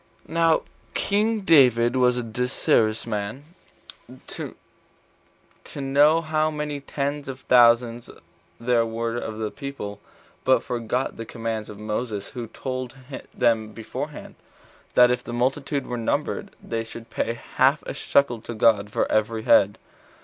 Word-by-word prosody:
1. - - -11
Now 165 -1 +3 0.3
king 215 +2 +1
David 125 - +5
was 125 -1 +3
desirous 115 -2 +1
to 120 - -8 1.5
know 145 +4 +4
how 155 -1 +1
many 150 -1 -4
ten 140 +1 -3
thousands 120 -3 +3 0.5
there 120 0 +2
were 115 +1 -3
of 110 -2 -5
the 110 -1 -3
people, 105 -8 -7 0.4
but 130 - +3
forgot 120 +2 -2
the 115 - -5
commands 115 -2 -4
of 105 - -9
Moses, 105 -1 -4
23 - - -24
who 115 - -5
told 130 +2 -5 0.4
them 110 -3 +1
beforehand, 135 +7 -6 0.6
that 125 0 +7
if 125 0 -1
the 120 - -7
multitude 135 +3 -1
were 125 - -4
numbered, 115 - -1
they 115 -1 -3
should 115 0 -11
pay 115 - -1 0.2
half - - +4
a - - -4
shekel 125 -5 +1
to 120 - -7
God 105 -2 +3
for - - 0
every 110 +1 +1
head. 100 -4 +4
120 Hz, 135 wpm, -24 LUFS, 115-140 Hz, 1.5 s, that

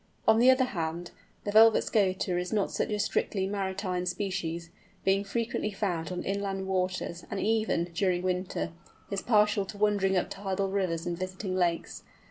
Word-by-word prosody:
On 220 0 +6
the 250 +2 +6
other 260 0 +5
hand, 170 -6 -3 0.3
the 205 - -2
Velvet 220 +1 +7
Scoter 185 -4 +1
is 180 0 -4
not 210 -3 +1
such - - -1
a 210 - 0
strictly 195 -1 0
maritime 190 -2 -2
species, 175 -3 -3 0.3
being 195 +1 +3
frequently 220 +1 -2
found 180 -5 -2
on 180 - -3
inland 195 -1 -2
waters, 185 -2 -2
and 200 - -3
even, 215 -6 +1
during 180 0 +1
winter, 180 -2 -2 0.4
is 200 0 -1
partial 210 -3 +3
to 205 - -9
wandering 200 -2 +2
up 180 - -1
tidal 195 0 -2
rivers 185 -4 -1
and 175 0 -3
visiting 185 +1 -4
lakes. 175 -2 0
190 Hz, 165 wpm, -29 LUFS, 180-205 Hz, 0.4 s, Velvet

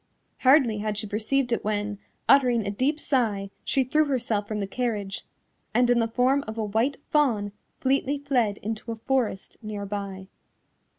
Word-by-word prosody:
Hardly 255 -5 +5
had 210 0 -2
she 215 - -1
perceived 240 +5 0
it 235 - 0
when, 205 -1 -2 0.3
uttering 245 -5 +5
a 200 - -1
deep 270 +9 0
sigh, 215 -9 0
she 270 - +1
threw 305 +5 +2
herself 230 -7 -1
from 215 -1 -3
the 200 - -1
carriage, 205 -3 -3 0.5
and 245 0 +4
in 240 - +4
the 230 - +2
form 255 +4 +2
of 220 +1 -6
a 220 - -1
white 225 +7 0
fawn 230 -9 +2 0.3
fleetly 275 +1 +1
fled 250 -8 0
into 220 +2 -4
a - - -3
forest 225 -4 -2
near 210 -2 -5
by. 195 -1 -5
225 Hz, 170 wpm, -26 LUFS, 205-260 Hz, 0.5 s, Hardly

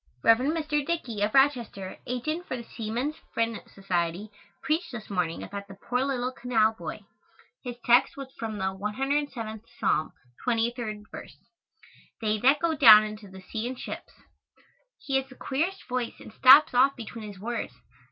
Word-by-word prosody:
Rev. 225 0 +6
Mr. 300 +1 0
Dickey, 265 -10 -3
of 210 +4 0
Rochester, 245 -9 +1
agent 310 +8 -3
for 255 - -3
the 235 - -7
Seaman's 235 +7 -4 0.2
Friend 230 -1 0
Society, 185 +1 -2 0.3
preached 320 +3 -1
this 220 -4 -8
morning 175 -4 -1
about 200 0 -7
the 195 - -11
poor 250 +5 -1
little 255 -2 -1
canal 225 -4 +1
boy. 225 - -7 0.6
His 245 -2 -5
text 240 +3 +4
was 270 -1 -8
from 220 -2 -4
the 190 -1 -1
107th 230 +1 -2 0.2
Psalm, 155 - +1 0.3
23rd 230 -3 -1
verse, - - -10 0.8
"They 215 -1 0
that 270 +6 +5
go 335 +1 0
down 215 -7 +9
into 215 -1 -7
the 190 0 -12
sea 220 +4 -4
in 255 - -4
ships." - - -8 0.8
He 280 -2 -1
has 270 0 -3
the 260 - -13
queerest 335 +11 -2
voice 250 -2 -3
and - - -12
stops 270 +5 +8
off 265 +3 +4
between 225 -2 -8
his 200 -2 -10
words. 235 +4 -4
240 Hz, 160 wpm, -27 LUFS, 215-270 Hz, 0.8 s, down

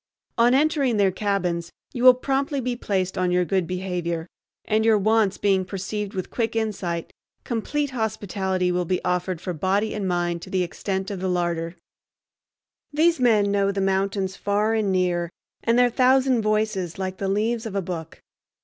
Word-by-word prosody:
On 240 +2 +5
entering 280 -5 +2
their 195 -2 +3
cabins 180 -4 -1 0.2
you 245 - -3
will 255 -1 +9
promptly 275 +2 -1
be 250 -1 -2
placed 190 -4 -2
on 180 -1 +1
your 180 0 +2
good 185 0 0
behavior, 180 -3 -3 0.4
and, 215 0 +1
your 220 -1 +5
wants 215 -1 +2
being 195 -2 +2
perceived 200 +2 -4
with 185 - -4
quick 230 -1 -1
insight, 195 -7 -2 0.3
complete 275 +5 -2
hospitality 195 -5 -1
will 180 0 0
be 180 +1 0
offered 180 -1 -1
for 180 +1 -4
body 195 +6 0
and 205 -3 -2
mind 175 -1 -1
to - - -9
the 185 -1 +1
extent 190 +2 -3
of 195 - -4
the 185 0 -1
larder. 170 -1 -1 1.2
These 320 +2 +3
men 215 -5 +3
know 200 0 +2
the 200 - -3
mountains 195 0 0
far 205 +3 0
and 215 -3 +1
near, 175 -2 +1 0.3
and 230 +1 +2
their 245 0 +4
thousand 255 0 +3
voices, 215 -5 -1
like 190 -1 -4
the 195 - -2
leaves 225 +3 0
of 205 - -7
a 195 - +1
book. 170 -2 -7
195 Hz, 175 wpm, -24 LUFS, 180-225 Hz, 1.2 s, will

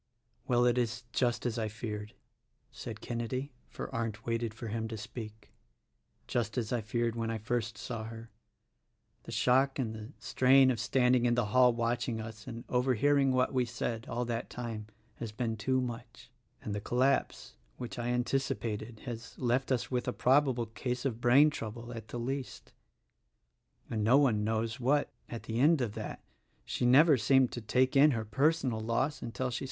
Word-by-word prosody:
"Well, 120 -1 +3
it 120 0 +3
is 120 0 -2
just 120 -1 +1
as 115 -1 -1
I 110 - -1
feared," 105 -1 -6 0.6
said - - -8
Kenedy, 125 +4 -3
— - - -36
for - - -7
Arndt 115 -2 -3
waited 115 -1 -1
for 115 +1 -7
him 110 +1 -2
to 110 0 -5
speak, 110 0 -9 0.4
— - - -43
"just 120 0 -1
as 115 -1 -1
I 120 - 0
feared 115 +2 -1
when 115 -1 -2
I 115 - -1
first 110 0 -2
saw 115 -3 -5
her: 115 0 -9 0.9
the - - -8
shock 135 +2 +3
and 120 -5 -2
the 110 +2 -8
strain 130 0 +5
of 120 - -2
standing 125 -1 +3
in 120 - +2
the 120 -2 +1
hall 125 -1 +6
watch 120 +1 -1
ing 115 -2 -2
us 110 -1 -8
and 115 +1 -6
overhearing 135 +2 +3
what 130 +1 +2
we 130 -1 +3
said, 115 -1 -4
all 120 +1 -1
that 115 0 -3
time, 115 -3 -5 0.3
has 115 -2 -5
been 115 +1 -2
too 130 +4 0
much; 120 -2 -6 0.3
and 105 - -3
the 105 - -3
collapse, 130 +5 0 0.2
which 120 0 -6
I 120 - -2
anticipated 120 -3 -2
has 115 -3 -7
left 125 +2 0
us 125 0 0
with 125 -1 -1
a 125 - 0
probable 130 -3 +3
case 125 +3 -4
of 120 -3 -2
brain 135 +6 +6
trouble, 120 -1 -6
at 115 -2 -8
the - - -6
least: 130 +2 -5 1.1
and 110 -2 -2
no 120 +6 +5
one 120 -7 +3
knows 110 +3 -1
what, 140 +4 +2 0.2
at 115 - -6
the 115 +1 -3
end 155 +4 +5
of 120 -5 -1
that. - - -6 0.4
She 120 - 0
never 145 +4 +7
seemed 130 +3 +4
to 120 - -5
take 130 +5 +2
in 145 +2 +7
her 110 - -3
personal 135 +1 +1
loss 115 +6 -1
until 125 +2 -3
she. 120 - -2
120 Hz, 185 wpm, -31 LUFS, 115-130 Hz, 1.1 s, never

